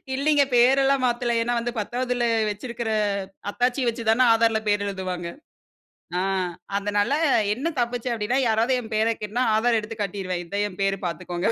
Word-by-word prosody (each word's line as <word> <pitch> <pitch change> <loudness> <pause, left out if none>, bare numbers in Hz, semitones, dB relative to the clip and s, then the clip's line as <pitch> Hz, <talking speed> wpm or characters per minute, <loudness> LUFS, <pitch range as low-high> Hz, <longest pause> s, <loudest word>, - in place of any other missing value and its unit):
இல்லீங்க. 290 +1 +3
பேரெல்லாம் 270 +2 +4
மாத்தல. 240 -1 0
ஏன்னா 240 +1 -1
வந்து 235 +1 -2
10வதில 245 +3 -1 0.3
வச்சிருக்கிற 235 +2 -4 0.6
அத்தாட்சிய 245 +3 0
வச்சு 230 0 -2
தானே 225 +3 +4
ஆதாரில 225 -1 +2
பேரு 205 -1 +2
எழுதுவாங்க. 185 -3 -4 0.9
ஆ - - 0 0.6
அதனால 205 +2 0 0.4
என்ன 265 +8 -3
தப்பிச்சேன்? 240 0 -1
அப்பிடீன்னா, 230 +4 0
யாராவது 225 +3 +2
என் 225 -1 -11
பேர 220 +1 +2
கேட்டனா 215 +4 -1
ஆதார 230 +1 +2
எடுத்து 220 +1 -7
காட்டிருவேன். 185 -2 -3
இதான் 200 +4 -2
என் 185 - -14
பேரு 195 0 +1
பார்த்துக்கோங்க. 175 +2 -3
225 Hz, 150 wpm, -24 LUFS, 205-245 Hz, 0.9 s, பேரெல்லாம்